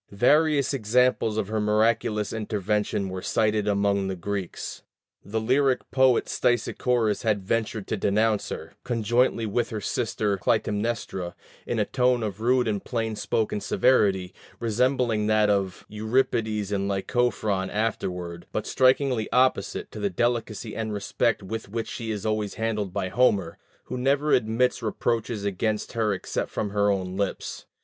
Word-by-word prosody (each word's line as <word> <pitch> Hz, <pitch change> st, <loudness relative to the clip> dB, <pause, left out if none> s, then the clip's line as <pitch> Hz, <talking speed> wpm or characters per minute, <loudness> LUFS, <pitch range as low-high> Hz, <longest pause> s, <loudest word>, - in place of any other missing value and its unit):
Various 145 Hz, +6 st, +3 dB
examples 125 Hz, -2 st, +2 dB
of 105 Hz, -, -1 dB
her 110 Hz, 0 st, -1 dB
miraculous 105 Hz, 0 st, +1 dB
intervention 105 Hz, -2 st, -1 dB
were 95 Hz, 0 st, -5 dB
cited 105 Hz, +1 st, +1 dB
among 100 Hz, -1 st, +1 dB
the 95 Hz, -, -2 dB
Greeks. 95 Hz, 0 st, -5 dB, 0.4 s
The 110 Hz, +3 st, -2 dB
lyric 130 Hz, +3 st, +2 dB
poet 130 Hz, -2 st, +4 dB
Stesichorus 120 Hz, -2 st, +1 dB
had 105 Hz, -4 st, 0 dB
ventured 110 Hz, 0 st, -1 dB
to 110 Hz, -, -2 dB
denounce 105 Hz, +2 st, +1 dB
her, -, -, -7 dB
conjointly 120 Hz, 0 st, +1 dB
with 115 Hz, +3 st, 0 dB
her 110 Hz, -, -4 dB
sister 105 Hz, 0 st, -1 dB
Clytemnestra, 105 Hz, -2 st, -1 dB, 0.3 s
in -, -, -1 dB
a -, -, +2 dB
tone 125 Hz, -2 st, +2 dB
of 105 Hz, -1 st, -4 dB
rude 125 Hz, +1 st, +3 dB
and 105 Hz, -3 st, -1 dB
plain 115 Hz, -2 st, -2 dB
spoken 105 Hz, 0 st, -1 dB
severity, 95 Hz, -8 st, +2 dB, 0.3 s
resembling 120 Hz, -1 st, +1 dB
that 110 Hz, -1 st, +4 dB
of 95 Hz, -2 st, -1 dB
Euripides 110 Hz, -2 st, 0 dB
and 100 Hz, -1 st, 0 dB
Lycophron 100 Hz, -1 st, 0 dB
afterward, 90 Hz, -5 st, -3 dB
but -, -, -2 dB
strikingly 130 Hz, -3 st, +2 dB
opposite 130 Hz, +1 st, +1 dB
to -, -, -8 dB
the 100 Hz, -1 st, 0 dB
delicacy 115 Hz, +2 st, -1 dB
and 110 Hz, -1 st, -3 dB
respect 105 Hz, +2 st, 0 dB
with 110 Hz, +2 st, -5 dB
which 115 Hz, +2 st, -3 dB
she 115 Hz, -1 st, -5 dB
is 105 Hz, -2 st, -3 dB
always 110 Hz, -2 st, -1 dB
handled 105 Hz, -3 st, -2 dB
by 95 Hz, -1 st, -2 dB
Homer, 100 Hz, -6 st, +2 dB, 0.2 s
who 125 Hz, -, -5 dB
never 140 Hz, +3 st, +2 dB
admits 125 Hz, +2 st, +2 dB
reproaches 115 Hz, -1 st, -1 dB
against 105 Hz, +2 st, -1 dB
her 110 Hz, -3 st, +1 dB
except 95 Hz, -, -3 dB
from 105 Hz, -, -3 dB
her 105 Hz, 0 st, +2 dB
own 95 Hz, -2 st, -1 dB
lips. 100 Hz, -1 st, -3 dB
110 Hz, 145 wpm, -26 LUFS, 100-120 Hz, 0.4 s, poet